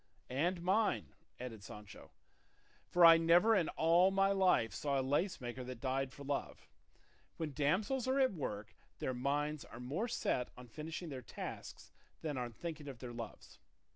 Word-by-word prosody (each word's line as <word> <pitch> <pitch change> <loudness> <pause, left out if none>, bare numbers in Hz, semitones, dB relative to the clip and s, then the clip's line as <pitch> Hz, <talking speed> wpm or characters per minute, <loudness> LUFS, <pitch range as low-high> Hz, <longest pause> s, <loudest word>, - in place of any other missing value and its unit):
"And 170 +6 0
mine," 200 +3 +1 0.3
added 115 -5 -7
Sancho; 105 -2 -11 0.8
"for 175 -1 +6
I 165 0 +10
never 175 +7 +5
in 180 -5 +2
all 170 +3 +4
my 195 0 +3
life 185 - +3
saw 140 -2 0
a - - 0
lace 145 +8 0
maker 125 0 -5
that 125 -1 -7
died 135 +1 -1
for 140 - -11
love; 140 0 -4 0.7
when 155 -3 -3
damsels 200 - +1
are 265 +1 +2
at 260 -5 +4
work 110 - -5 0.2
their 130 - -2
minds 145 +4 -1
are - - -11
more 145 - -2
set 175 - -1
on 125 - -10
finishing 160 +6 -6
their 135 -3 -5
tasks - - -8 0.3
than 150 -3 -2
on 125 -2 -3
thinking 155 +5 -6
of 135 -3 -7
their 120 0 -7
loves. 115 -2 -9
145 Hz, 170 wpm, -36 LUFS, 125-180 Hz, 0.8 s, I